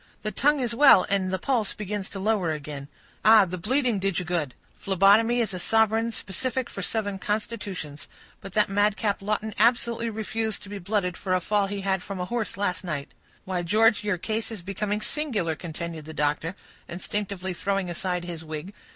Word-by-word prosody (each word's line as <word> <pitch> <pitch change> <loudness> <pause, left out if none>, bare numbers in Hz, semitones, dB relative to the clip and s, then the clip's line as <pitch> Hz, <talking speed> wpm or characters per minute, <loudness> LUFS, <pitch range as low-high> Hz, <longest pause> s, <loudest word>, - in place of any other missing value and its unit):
"The 215 - -1
tongue 290 +8 +3
is 240 -2 -1
well, 240 -7 +7
and 195 -2 +1
the 190 - 0
pulse 225 0 0
begins 205 -1 -4
to 195 - -6
lower 195 -4 +1
again. 145 -2 -6 0.4
Ah! 215 -2 +8
the 185 0 -5
bleeding 245 +2 +1
did 195 -2 0
you 180 - -1
good. 160 -7 -1 0.2
Phlebotomy 205 +5 +4
is 215 -4 -1
a 185 - -4
sovereign 225 +3 +2
specific 250 +5 -3
for 195 - -5
southern 205 0 -2
constitutions. 205 -8 -4 0.3
But 195 - -9
that 210 0 +3
madcap 205 +1 +1
Lawton 215 +1 -1
absolutely 235 0 +3
refused 220 0 -2
to 200 - -10
be 205 0 -5
blooded 185 -1 -1
for 185 -2 0
a - - +2
fall 205 +3 +1
he 200 0 -4
had 190 -1 0
from 195 +1 -6
his 180 0 -4
horse 235 -4 -2
last 195 -2 -1
night. 150 -6 -4 0.4
Why, 185 -2 -1
George, 215 +5 +4
your 205 -3 0
case 220 +5 -2
is 210 -6 -7
becoming 205 +3 -2
singular," 215 - -1
continued 165 -1 -6
the 160 0 -9
doctor, 150 +4 0 0.3
instinctively 190 +1 -3
throwing 195 +1 -1
aside 180 +1 -2
his 170 -2 -6
wig. 155 +5 -6
200 Hz, 185 wpm, -26 LUFS, 180-220 Hz, 0.4 s, Ah